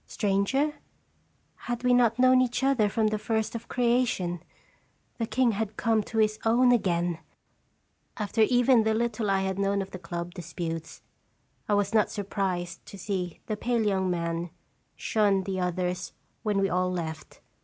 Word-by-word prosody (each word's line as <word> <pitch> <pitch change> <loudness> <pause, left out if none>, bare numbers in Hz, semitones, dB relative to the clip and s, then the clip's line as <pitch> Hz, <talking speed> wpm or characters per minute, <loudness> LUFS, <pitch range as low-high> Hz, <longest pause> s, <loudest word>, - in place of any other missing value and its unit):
Stranger? 210 +9 +1 0.8
Had 240 0 -5
we 250 0 +4
not 240 -2 +4
known 255 0 +5
each 250 +1 -1
other 255 -6 +3
from 215 +1 +1
the 215 0 -2
first 220 +1 -1
of 230 0 -6
creation? 235 -8 0 0.8
The 230 - -1
king 255 -1 +2
had 215 0 -3
come 225 -2 +2
to 225 - -6
his 215 -1 +2
own 245 +3 +4
again! 175 -7 +1 1.0
After 215 +1 -1
even 245 +2 +5
the 220 0 +1
little 230 -2 -1
I 195 -1 +2
had 190 0 -2
known 200 0 +1
of 195 0 -4
the 185 - -7
club 170 0 -5
disputes, 165 -1 -6 0.7
I 205 - +4
was 205 +1 0
not 215 -2 +3
surprised 185 -4 -3
to 200 - -10
see 185 -3 -4
the 215 - -2
pale 235 +1 0
young 190 -2 +1
man 170 0 -2 0.5
shun 205 -3 +1
the 190 0 -3
others 180 0 -2 0.3
when 210 -2 0
we 195 - +2
all 180 0 0
left. 160 -3 -6
205 Hz, 165 wpm, -27 LUFS, 180-230 Hz, 1.0 s, known